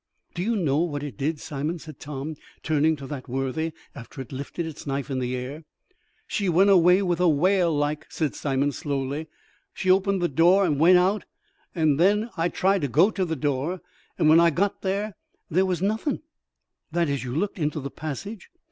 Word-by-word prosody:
"Do 175 - -4
you 225 +5 0
know 155 -8 +1
what 150 -4 -1
it 145 - -6
did, 150 +2 -2
Simon," 150 +5 -3
said 155 -4 -11
Tom, 150 +1 -5 0.3
turning 155 0 +2
to 140 -2 -9
that 135 -2 -7
worthy, 135 +5 -2 0.2
"after 135 +1 -11
it 130 - -7
lifted 140 +5 -5
its 160 -2 -8
knife 140 0 -3
in 130 - -1
the 125 0 -2
air?" 135 +5 -6 0.6
"She 200 -3 -1
went 190 +4 +5
away 180 +1 +5
with 175 -2 0
a 180 -1 +4
wail 175 +3 +3
like," 145 0 -1
said 155 -4 -2
Simon, 140 0 0
slowly; 140 +2 -3 0.5
"she 185 - +2
opened 195 +1 +2
the 175 - +1
door 175 +6 +4
and 150 -5 0
went 180 +3 +7
out. 190 +4 +1 0.5
An' 155 -4 +2
then 210 +7 +3
I 165 +1 0
tried 190 +1 +1
to 145 - 0
go 165 - +4
to 195 - -1
the 165 -2 -2
door, 145 +5 -1 0.4
and - - +3
when 160 +2 +7
I 170 0 +6
got 190 +6 -1
there, 200 +2 -2 0.4
there 185 +4 +3
was 180 -1 -1
nothin'." 220 +10 -1 0.7
"That 170 0 +1
is, 140 -2 -2
you 125 0 -5
looked 195 +3 -2
into 150 0 -1
the 140 -1 -6
passage?" 180 - -6
160 Hz, 200 wpm, -25 LUFS, 145-185 Hz, 0.7 s, went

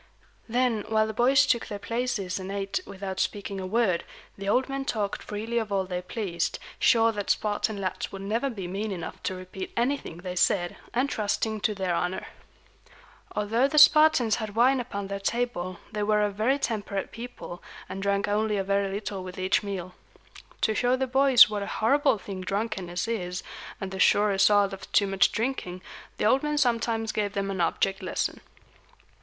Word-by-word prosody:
Then, 240 -2 +1
while 220 -1 +3
the 220 - -4
boys 265 +5 +4
took 235 -4 +1
their 205 - -5
places 205 -4 -2
and 190 +1 -6
ate 195 - -2
without 190 -1 -5
speaking 200 -1 -2
a 185 - -4
word, 200 -4 +1 0.3
the 195 0 -4
old 255 +5 +2
men 275 0 -3
talked 210 -6 -2
freely 225 +3 -2
of 220 -2 -4
all 195 -1 +1
they 180 -1 -3
pleased, 180 -2 -2 0.2
sure 230 -1 +5
that 205 -2 -5
Spartan 210 0 0
lads 185 -2 -3
would 195 0 -7
never 230 +7 0
be 200 -7 -5
mean 200 +4 -3
enough 175 -4 -6
to 185 - -2
repeat 185 +1 -7
anything 240 - -1
they 180 +1 -6
said, 175 -1 +2 0.2
and 250 +3 +1
trusting 215 -2 -1
to 210 +2 +1
their 190 -2 -1
honor. 180 +2 -2 1.1
Although 225 +5 +2
the 305 - -2
Spartans 300 -7 +6
had 215 -2 -5
wine 255 +3 +4
upon 200 -5 -4
their 200 0 -4
table, 195 -4 -2
they 210 -1 -3
were 210 0 +2
a 205 - +1
very 220 +7 +1
temperate 205 -6 -3
people, 230 -7 -8 0.3
and 195 - -6
drank 200 0 +1
only 210 0 +1
a 195 - 0
very 200 0 +1
little 195 -1 -4
with 185 0 -8
each 185 0 +2
meal. 185 -3 -5 0.7
To 220 - +2
show 245 +3 +2
the 265 0 0
boys 265 -1 +7
what 210 -1 -3
a 200 - -4
horrible 275 +3 +3
thing 195 -1 -7
drunkenness 190 -2 -2
is, 185 -5 -3 0.4
and 195 -1 -5
the 190 - -6
sure 210 +1 +5
result 200 0 +4
of 195 - -9
too 200 - +5
much 195 0 +3
drinking, 215 -6 -3 0.3
the - - 0
old 260 +5 +4
men 300 0 -1
sometimes 230 -4 +1
gave 205 -2 -1
them 195 0 -2
an 190 -2 -2
object 195 +3 0
lesson. - - -2
205 Hz, 185 wpm, -27 LUFS, 195-230 Hz, 1.1 s, boys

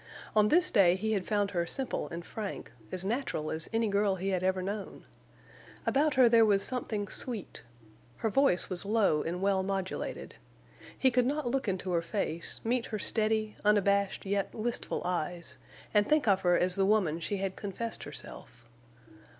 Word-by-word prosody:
On 210 -1 +5
this 355 +8 +4
day 185 -5 +5
he 220 +3 -2
had 195 -4 -1
found 205 -2 +1
her 170 -2 -1
simple 265 +6 -2
and 170 0 -6
frank, 210 -3 -6 0.2
as 185 0 0
natural 210 - -2
as 160 0 -3
any 225 0 +1
girl 200 -1 +2
he 190 +1 -3
had 185 -2 0
ever 185 0 0
known. 200 +1 -5 0.8
About 290 +1 +2
her 255 -2 +7
there 230 -1 +6
was 200 -2 +3
something 220 -5 -2
sweet. 225 -1 -4 0.6
Her 220 - -1
voice 270 -7 +3
was 185 -2 -4
low 200 -7 +2
and 180 +3 -3
well 195 -1 +2
modulated. 190 -1 -4 0.6
He 260 - +3
could 250 0 +2
not 285 -3 -1
look 270 -2 -1
into 185 -1 -2
her 170 -1 +2
face, 170 -2 -3
meet 235 +1 0
her 215 - -3
steady, 215 0 0
unabashed, 200 -2 +2
yet 200 0 -1
wistful 235 +2 -2
eyes, 170 -5 -3 0.3
and 210 -1 +3
think 305 -5 +3
of 195 -2 +4
her 175 -1 +3
as 180 0 +3
the 195 -1 +2
woman 190 -7 +2
she 200 +4 -3
had 195 -1 -3
confessed 215 +3 -5
herself. 120 - -9
200 Hz, 175 wpm, -30 LUFS, 185-225 Hz, 0.8 s, her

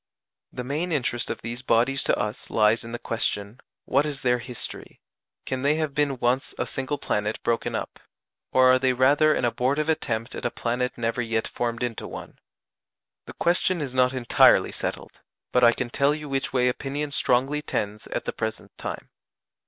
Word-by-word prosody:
The 125 - -5
main 150 +7 -2
interest 125 -5 0
of - - -5
these 120 +2 -4
bodies 125 +2 +2
to - - +2
us 105 0 -4
lies 110 +1 +3
in 115 - -8
the 120 - -3
question, 110 -1 -2 0.3
What 140 +2 +3
is 145 -3 -4
their 125 -1 +2
history? 120 0 -7 0.5
Can 130 -1 -3
they 145 +2 +3
have 155 -3 -2
been 145 -2 +1
once 125 +2 0
a - - -1
single 135 +2 -3
planet 105 -4 -1
broken 115 -1 0
up? - - -5 0.5
or 130 0 +6
are 130 - +4
they 130 0 +2
rather 145 +4 +4
an - - 0
abortive 135 +6 0
attempt 120 -6 -1
at - - -6
a 120 - +1
planet 125 +1 -2
never 115 +1 -1
yet 115 -1 -1
formed 120 0 -3
into 120 -2 -3
one? - - -9 0.9
The - - -8
question 175 +1 +2
is 140 -4 -4
not 125 0 +3
entirely 125 -3 +4
settled, - - -5 0.3
but 125 - +3
I 120 - +8
can 120 0 -3
tell 140 +3 +2
you 150 -1 -7
which 135 -1 -1
way 125 -1 +2
opinion 145 +3 -2
strongly 135 +3 +1
tends 105 -6 -3
at - - -4
the - - -3
present 110 0 -5
time. - - -6
125 Hz, 185 wpm, -25 LUFS, 115-140 Hz, 0.9 s, I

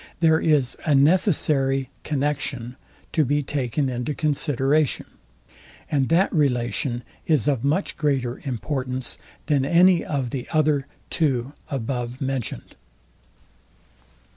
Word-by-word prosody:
There 160 -1 +4
is 145 -6 +2
a 150 -4 +3
NECESSARY 140 - +3
CONNEXION 140 -4 -2 0.4
to 155 - +2
be 145 +2 +1
taken 135 0 -1
into 125 +3 -3
consideration; 145 -1 +1 0.9
and 135 -3 +1
that 175 +4 +3
relation 125 - 0 0.2
is 150 -9 +2
of 135 -5 +1
much 155 +8 0
greater 135 -5 -1
importance, 130 -1 -3 0.3
than 145 -3 +2
any 175 +4 +5
of 135 -5 -2
the 130 -3 -4
other 150 -3 +2 0.2
two 135 -4 0 0.2
above 125 -1 -3
mentioned. 130 - -4
140 Hz, 110 wpm, -23 LUFS, 130-150 Hz, 0.9 s, any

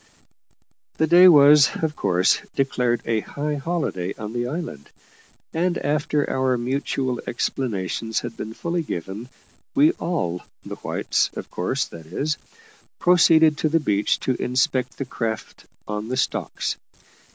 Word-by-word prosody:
The 160 - +3
day 175 +3 +8
was, 145 -3 +8
of 155 -1 0
course, 90 +1 +2
declared 125 -3 0
a 115 -1 +1
high 150 +7 -4
holiday 140 - -2
on 105 0 -6
the 120 0 -1
island; 145 - -6 0.6
and, 175 +2 +1
after 145 0 0
our 130 -1 +1
mutual 130 0 -2
explanations 115 -3 -2
had 120 -1 -6
been 110 +1 -7
fully 170 0 -2
given, 100 - -6 0.5
we 295 +3 +6
all 90 - -2 0.2
the - - -7
whites, - - 0
of - - -7
course, 110 +10 -1
that 80 -2 -12
is 150 - -2 0.6
proceeded 160 -3 +5
to 155 - +1
the 165 +2 +3
beach 105 -8 +1
to 130 - +1
inspect 125 0 0
the 135 - -3
craft 115 -3 -5 0.2
on 105 +1 -4
the 130 +2 -2
stocks. - - -2
130 Hz, 140 wpm, -23 LUFS, 110-155 Hz, 0.6 s, day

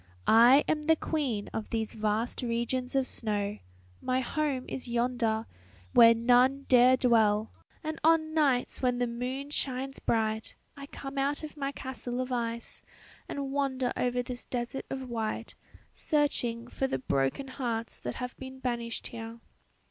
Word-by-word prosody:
I 240 +6 +7
am 305 -1 +1
the 320 +2 +4
queen 270 -11 -2
of 220 - -4
these 225 -1 -2
vast 215 +3 -1
regions 245 +2 -1
of 270 -1 +3
snow 210 -4 -2 0.4
my 255 0 +1
home 270 0 -1
is 255 - -5
yonder, 235 -2 0 0.5
where 230 0 +8
none 250 +4 +4
dare 255 0 +6
dwell 220 -4 +3 0.3
and 310 0 -4
on 315 -1 +4
nights 280 -6 +1
when 250 -1 +2
the 245 - +1
moon 250 +4 -4
shines 270 -1 -2
bright 220 -1 -1 0.2
I 280 0 -9
come 275 0 -6
out 285 +3 0
of 305 - -7
my 275 -2 -2
castle 255 -2 -5
of 255 0 -2
ice 235 -1 -3 0.5
and 275 -1 -3
wander 265 -3 0
over 245 0 0
this 245 0 -6
desert 245 +2 -4
of 265 -1 -4
white, 225 -1 -3 0.4
searching 245 -6 0
for 265 +2 -1
the 265 - -1
broken 140 - -1
hearts 235 -4 -3
that 125 - -5
have 250 0 -5
been 265 0 -8
banished 235 -3 -3
here. 230 0 -8
250 Hz, 155 wpm, -30 LUFS, 230-270 Hz, 0.5 s, where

